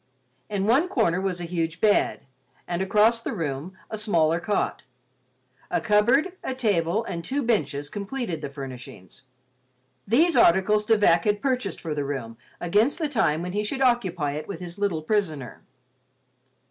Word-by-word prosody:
In 200 -2 -1
one 265 - +3
corner 180 - +1
was 190 -2 -2
a - - -4
huge 165 -1 -2
bed, 210 -2 +2 0.5
and 175 +1 -2
across 215 +4 +3
the - - -4
room 160 +2 -4
a 220 - -5
smaller 170 -6 +2
cot; 205 +4 -1 0.9
a - - +1
cupboard, 245 - +3
a 260 - -3
table, 205 -4 +1
and 170 -5 -5
two 280 +7 -2
benches 145 - 0
completed 200 - -4
the 145 - -4
furnishings. 130 -9 -10 0.9
These 320 - +3
articles 210 +4 +4
De 225 - +5
Vac 170 -5 +4
had 205 -1 +2
purchased 250 -8 -1
for 160 -2 -4
the 145 -1 -2
room 130 -5 -5 0.2
against 210 +10 +2
the 315 -4 -1
time 175 - +1
when 180 - -4
he 210 +1 0
should 265 +6 -3
occupy 185 - +1
it 150 +2 -5
with 195 -5 -6
his 175 +1 -8
little 185 -6 -1
prisoner. 155 - -2
190 Hz, 160 wpm, -25 LUFS, 160-220 Hz, 0.9 s, De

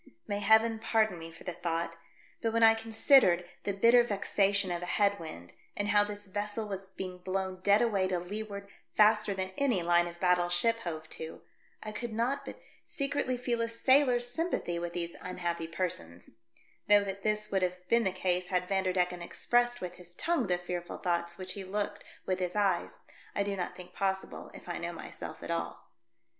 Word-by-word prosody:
May 205 0 -2
Heaven 220 +1 +4
pardon 220 -5 +1
me 165 0 -7
for 165 - -13
the 180 - -4
thought, 165 0 -2 0.5
but 225 - +1
when 230 0 +3
I 225 0 +9
con 225 0 -7
sidered 220 -8 +5 0.2
the 200 - +1
bitter 230 +5 +6
vexation 200 -3 +1
of 175 0 -2
a 180 - -5
head 200 +1 +2
wind, 90 - -9 0.2
and 205 0 -1
how 205 0 +5
this 205 0 -6
vessel 205 +2 -3
was 195 -1 -5
being 185 -1 -7
blown 190 0 -2
dead 205 +3 +5
away 200 -5 +2
to 185 -1 0
leeward 200 +2 -5 0.3
faster 215 -1 +4
than 190 0 -3
any 245 -11 +2
line 175 0 +4
of 170 0 -9
battle 180 -1 +3
ship 225 +7 +3
hove 160 -7 -5
to, 160 0 -7 0.4
I 215 - -5
could 225 +2 -5
not 245 +5 0
but - - -8 0.2
secretly 275 -3 -1
feel 240 -1 -1
a 230 - +1
sailor's 245 +1 +3
sympathy 245 - -2
with 170 0 -4
these 170 -1 -3
unhappy 170 -2 -3
persons, 165 - -4 0.6
though 205 0 +7
that 195 0 -5
this 210 0 -1
would 195 -1 +2
have 180 0 -2
been 235 +3 +4
the 190 - +1
case 180 -1 -1
had 180 -1 0
Vanderdecken 185 -2 +1
expressed 240 +7 +1
with 180 -1 -5
his 175 -1 -14
tongue 330 - 0
the 180 -1 +2
fearful 175 0 -5
thoughts 170 -1 -1
which 185 -1 -5
he 200 - -6
looked 205 +2 -3 0.2
with 185 0 0
his 180 0 -2
eyes 195 -4 0 0.3
I 200 - +2
do 200 0 -2
not 180 -2 -3
think 180 -1 -11
possible, 190 -1 -2
if - - -12
I - - -3
know - - -4
myself - - -8
at - - -4
all. - - -4
195 Hz, 195 wpm, -31 LUFS, 180-220 Hz, 0.6 s, I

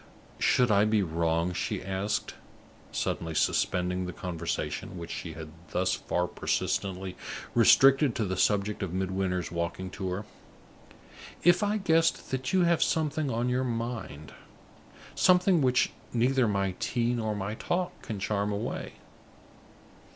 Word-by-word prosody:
"Should 125 -3 +3
I 100 0 +5
be 110 -1 +2
wrong," 85 +1 0
she - - -3
asked, 95 +2 -2 0.6
suddenly 80 -1 -2
suspending 90 +3 +1
the - - -4
conversation 90 0 -4
which 85 -1 -7
she 85 - -5
had 80 0 -8 0.2
thus 95 +1 +1
far 90 - -1
persistently 95 +1 -2 0.4
restricted 130 +4 +6
to 110 - 0
the 95 -1 -2
subject 105 +2 +1
of 95 -3 -3
Midwinter's 95 -2 -1
walking 85 +2 -3
tour, 95 +2 -4 1.2
"if 175 +3 +5
I 210 +1 +1
guessed 165 -4 +1
that 130 -1 -2
you 190 -1 +4
have 170 -1 +3
something 155 -2 +1
on 120 0 -1
your 125 +1 +1
mind 115 - -4 0.8
something 180 -2 +4
which 125 -1 +3 0.2
neither 125 +1 +2
my 100 -2 0
tea 120 +1 0
nor 110 -3 -1
my 100 +1 -3
talk 175 +10 -2
can 110 -5 -5
charm 100 +1 -1
away? 100 +1 -4
105 Hz, 135 wpm, -29 LUFS, 90-125 Hz, 1.2 s, restricted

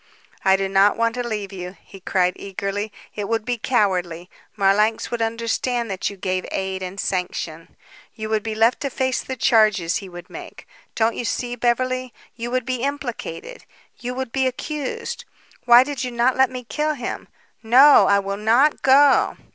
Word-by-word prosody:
"I 190 - +5
do 195 0 -1
not 195 +1 +3
want 230 0 +1
to 250 - -3
leave 205 -3 -4
you," 180 0 -7
he 195 - -14
cried 180 -1 +1
eagerly. 200 +2 -4 0.2
"It 205 -1 -5
would 225 -1 -1
be 245 -2 -2
cowardly. 185 -7 0 0.2
Marlanx 210 +2 +2
would 240 -1 -2
understand 230 +1 -1
that 190 - -2
you 200 - -10
gave 185 0 -2
aid 190 0 -3
and 185 +2 -6
sanction. 175 -4 -4 0.4
You 220 -1 -5
would 220 -1 +1
be 220 0 -4
left 225 +3 +3
to 280 - -2
face 260 0 -1
the 260 - -6
charges 215 -8 +3
he 195 - -8
would 175 0 -10
make. - - -11 0.3
Don't 225 0 +2
you - - -3
see, 245 +1 -2
Beverly? 255 +1 -1 0.2
You 235 0 -5
would 255 -1 -1
be 255 0 -1
implicated 275 - -5 0.4
you 250 +1 -5
would 260 -2 -4
be 265 +1 +1
accused. 280 +2 -4 0.4
Why 240 +1 +8
did 275 -1 -4
you 250 - -2
not 240 +1 +1
let 265 -1 +4
me 255 -1 -7
kill 300 +5 -2
him? 245 -3 -5 0.3
No; 260 +6 +7
I 200 - +4
will 200 0 -2
not 235 +8 +3
go!" 275 +1 +4
225 Hz, 180 wpm, -22 LUFS, 195-255 Hz, 0.4 s, Why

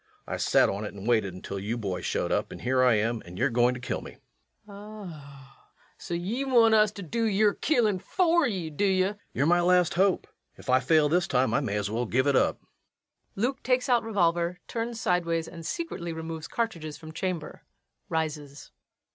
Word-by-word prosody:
I - - -4
sat - - +4
on 100 +2 -3
it 105 - -6
and 100 +2 -8
waited 110 -6 +1
until 95 +1 -6
you 110 +5 -3
boys 95 -5 -3
showed - - -1
up, - - 0
and - - -9
here 130 +1 +1
I 125 -3 +5
am, 115 +2 0
and 90 +1 -11
you're 140 - +1
going 120 +1 +3
to - - -7
kill 125 - -3
me. - - -10 0.5
LUKE. - - -20
Ah, 155 -11 -12 0.3
so 170 - -5
ye 200 +10 -2
want 235 -4 +5
us 215 -1 +5
to 200 - -7
do 230 +8 -2
yer 210 -1 +3
killin' 225 -10 +1
fer 340 - +2
ye, 180 -8 -3
do 150 - -2
ye? 190 -2 +3
REVENUE. 205 +2 -3 0.2
You're 140 - +2
my 175 +2 +4
last 180 -1 +3
hope. 190 +1 +2 0.3
If 130 - -4
I 130 - +5
fail 150 +3 +3
this 175 +4 +1
time 130 0 +1
I - - +3
may 120 -8 -2
as 105 0 -2
well 120 +2 -1
give 130 +5 +1
it 140 -1 +2
up. - - +2 0.8
LUKE. 245 +6 -1
[_Takes 255 +1 +1
out 245 -1 +4
revolver, 175 -5 0
turns 230 0 -4
sidewise 170 -4 0
and 170 -2 -9
secretly 170 - -4
removes 160 0 -6
cartridges 170 -10 -3
from 155 -1 -10
chamber. 165 -2 -4 0.5
Rises. 150 -3 -4
165 Hz, 205 wpm, -27 LUFS, 130-205 Hz, 0.8 s, I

